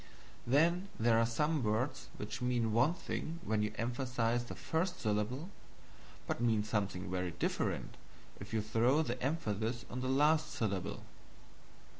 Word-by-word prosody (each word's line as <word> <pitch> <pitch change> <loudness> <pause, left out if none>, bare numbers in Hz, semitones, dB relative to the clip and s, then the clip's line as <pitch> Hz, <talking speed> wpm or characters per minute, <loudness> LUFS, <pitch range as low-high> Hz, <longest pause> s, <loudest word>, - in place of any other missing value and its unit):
Then 170 +8 +3
there 115 0 +4
are 115 - +3
some 150 +6 +1
words 125 +4 0
which 105 - -5
mean 120 -3 +1
one 130 +9 +4
thing 165 -2 -4
when 110 -1 +1
you 105 0 0
emphasize 120 0 0
the - - -7
first 180 +3 -1
syllable, 115 - -1 0.7
but - - -2
mean 110 -3 +3
something 100 -3 -2
very 90 -1 -1
different - - -1 0.4
if - - -8
you 110 -1 0
throw 120 +8 +3
the 125 -3 -3
emphasis 120 -5 -1
on 125 - -3
the 130 - -1
last 150 +3 +4
syllable. 100 - -2
120 Hz, 145 wpm, -35 LUFS, 110-145 Hz, 0.7 s, there